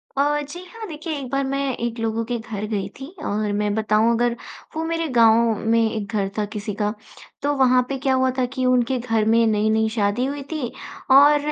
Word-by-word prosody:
अ, 290 +2 +2
जी 295 +5 -8
हाँ 440 +4 -9
देखिए 315 0 -5
एक 265 -2 -7
बार 275 0 +1
मैं 275 +1 -2 0.2
एक 235 0 -3
लोगों 225 0 -1
के 240 +1 -2
घर 215 -2 -5
गई 205 -3 -2
थी 270 - -7 0.2
और 210 0 -1
मैं 205 0 0
बताऊँ 220 +1 +2
अगर 240 0 +1 0.4
वो 320 - -2
मेरे 330 0 -1
गाँव 230 0 +5 0.2
में 230 - +4
एक 215 -3 -4
घर 195 -2 0
था 210 - +1
किसी 210 0 -4
का। 210 0 -1 0.5
तो 290 +1 +1
वहाँ 255 -2 +4
पे 275 - -2
क्या 265 0 0
हुआ 260 0 +2
था 255 - +2
कि 260 -1 -1
उनके 255 0 +2
घर 225 -3 0
में 230 +1 +4
नई-नई 220 +1 +2
शादी 210 +3 +1
हुई 280 +1 -4
थी 290 -7 -3 0.4
और 290 +2 +6
240 Hz, 215 wpm, -22 LUFS, 220-275 Hz, 0.5 s, और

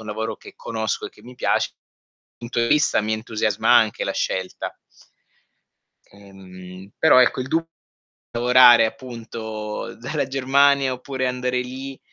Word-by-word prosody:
un 105 - -11
lavoro 110 0 -4
che - - -14
conosco 110 -2 -3
e - - -11
che 105 - -21
mi 125 +2 -13
piace, - - 0 0.7
punto 120 0 -5
di 115 - +1
vista 150 -3 +3
mi 110 +1 -2
entusiasma 110 -1 -1
anche - - +3
la - - -2
scelta. 95 -1 -4 1.4
Mhmm, 95 -1 -13
però 160 -5 +6
ecco 125 +1 +3
il 125 - -6
du 165 +4 0 0.7
lavorare 120 -1 +6
appunto 110 -3 -6
dalla 140 +3 -3
Germania 135 0 +2
oppure 130 +1 -4
andare 125 0 -1
lì 130 +2 -7
120 Hz, 140 wpm, -22 LUFS, 110-130 Hz, 1.4 s, però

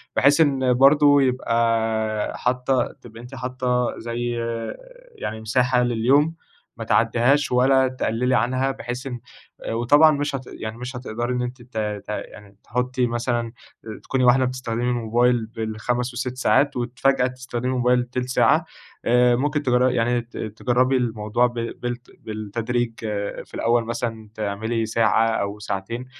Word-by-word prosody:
بحيث 145 +3 +5
إن 135 -4 +3
برضه 145 +2 +5
يبقى 115 -4 0
حاطة 125 0 0
تبقي 115 -1 -12
أنتِ 125 +3 -10
حاطة 125 -1 -1
زي 120 +1 -3 0.8
يعني 110 - -5
مساحة 125 +3 +2
لليوم 130 +7 +2 0.4
ما - - -5
تعدّيهاش 120 +5 +2
ولا 130 +1 +4
تقلّلي 125 0 0
عنها، 130 +3 +1
بحيث 125 +1 -6
إن 125 -2 -5 0.5
وطبعًا 145 +7 +5
مش 145 -1 -1
هت 130 -1 -6
يعني 110 +1 -7
مش 125 +2 -7
هتقدري 120 0 -3
إن 125 - -1
أنت 125 +1 -5
ت 120 -1 -11
ت 105 -2 -3
يعني 105 -1 -7
تحطي 125 +1 -1
مثلًا 120 0 -2 0.5
تكوني 130 -1 0
واحدة 130 +1 +5
بتستخدمي 125 -2 -3
الموبايل 120 0 +1
بال5، 115 +2 -3
وال6 125 +1 -4
ساعات، 140 +1 +2
وفجأة 125 +2 +1
تستخدمي 125 -1 -5
الموبايل 125 -1 +2
تِلت 125 +1 -4
ساعة، 130 - +3 0.4
آآ 125 0 +4
ممكن 145 +4 -1
تجرّ 125 -1 +3
يعني 120 0 +1
ت 120 +1 -13
تجرّبي 125 +4 +1
الموضوع 115 -1 0
ب 120 - -9
بال 120 +1 -4 0.2
بالتدريج، 115 +3 -3 0.5
في - - -25
الأول 115 0 +1
مثلًا 115 -2 -4
تعملي 110 +2 -2
ساعة 115 0 +2
أو 105 -2 -2
ساعتين، 105 +4 -4
120 Hz, 140 wpm, -23 LUFS, 115-130 Hz, 0.8 s, بحيث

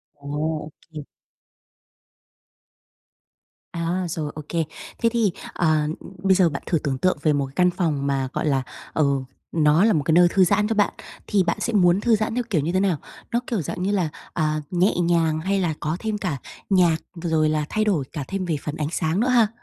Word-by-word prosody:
Ồ, 145 0 -13 0.4
ô 155 - -11 0.2
kê. 155 -2 -7 2.7
À, 170 +2 -1
rồi, 150 -2 -3
ô 155 - -5
kê. 165 -1 0 0.4
Thế 230 - +3
thì, 225 -5 +2 0.2
ờ, 155 -3 +2 0.4
bây 190 -1 +5
giờ 180 -3 +4
bạn 140 - -5
thử 165 - +1
tưởng 140 -3 -2
tượng 185 +2 +1
về 150 0 +3
một 140 -2 -1
căn 180 -1 +4
phòng 150 -6 -1
mà, 135 -1 0
gọi - - -1
là, 135 -2 +2 0.3
ờ, 155 - +2 0.5
nó 155 +2 +4
là 220 - +4
một 150 - +1
cái 160 - +1
nơi 175 +1 +7
thư 190 +1 +4
giãn 210 +3 +3
cho 225 - -1
bạn, 205 -1 +2 0.3
thì 195 -3 +3
bạn - - 0
sẽ 235 - -2
muốn 185 0 +4
thư 235 -2 +4
giãn 215 +2 -1
theo 245 - 0
kiểu 165 -8 +2
như 165 +4 -1
thế 185 - +2
nào? 190 -6 +2 0.3
Nó 235 - +2
kiểu 220 -7 -1
dạng 175 +5 -4
như 200 - +1
là, 180 -6 +1 0.2
à, 155 -1 0
nhẹ 180 +3 +3
nhàng 170 -2 +2
hay 195 +4 0
là 170 -4 0
có 155 +3 -2
thêm 215 -2 -2
cả 180 -8 -2 0.3
nhạc, 175 -4 +4 0.3
rồi 155 -2 +2
là 155 -1 0
thay 215 - +1
đổi 185 -9 +1
cả 145 -4 -4
thêm 195 -1 -3
về 165 -3 0
phần 150 - -4
ánh 150 -1 -2
sáng 160 +3 0
nữa 245 - +2
ha? 235 -4 +5
170 Hz, 215 wpm, -23 LUFS, 155-195 Hz, 2.7 s, nơi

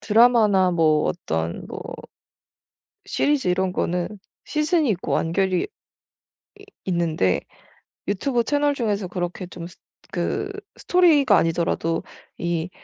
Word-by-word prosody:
드라마나 215 -4 +5
뭐 155 -3 +3
어떤 80 - -3
뭐 - - -7 1.3
시리즈 290 -5 +1
이런 180 +1 +1
거는 175 0 -1 0.4
시즌이 305 -1 +1
있고 185 -3 -2
완결이 185 +2 +1
이 - - -5 1.2
있는데 165 - +1 0.7
유튜브 240 +2 0
채널 290 +1 +1
중에서 210 -7 -1
그렇게 180 +1 -4
좀 175 -1 -8
스 175 - -16 0.4
그 400 - -2 0.3
스토리가 300 - +4
아니더라도 165 0 0 0.4
이 170 0 -1
185 Hz, 240 characters per minute, -23 LUFS, 170-245 Hz, 1.3 s, 드라마나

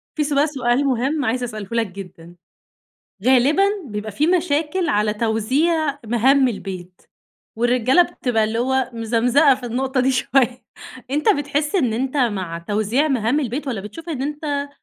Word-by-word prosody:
في 300 - 0
سؤ 290 0 +2
سؤال 265 -2 0
مهم 270 +3 0
عايز 250 +2 -1
أسأله 215 -4 -6
لك 230 -2 0
جدًا. 180 -3 -11 0.9
غالبًا 265 +8 +4 0.2
بيبقى 210 -1 -5
في 295 +8 +1
مشاكل 335 0 0
على 210 0 +1
توزيع 275 +8 0
مهام 260 +4 +3
البيت، 185 -4 -7 0.6
والرجالة 245 +6 +3
بتبقى 245 -10 -1
اللي 220 +2 -2
هو 260 0 0
مزمزقة 240 +5 +3
في 250 -1 -8
النقطة 260 +2 -1
دي 260 +2 +2
شوية. 250 -1 +1 0.5
أنت 295 +2 0
بتحس 290 +3 0
إن 255 - +2
أنت 260 +5 -2
مع 190 -10 -1
توزيع 215 - 0
مهام 255 +2 +1
البيت، 275 +2 -4
والّا 225 -6 -3
بتشوف 220 - -10
إن 275 -5 -3
أنت 290 -1 -3
255 Hz, 150 wpm, -21 LUFS, 225-285 Hz, 0.9 s, غالبًا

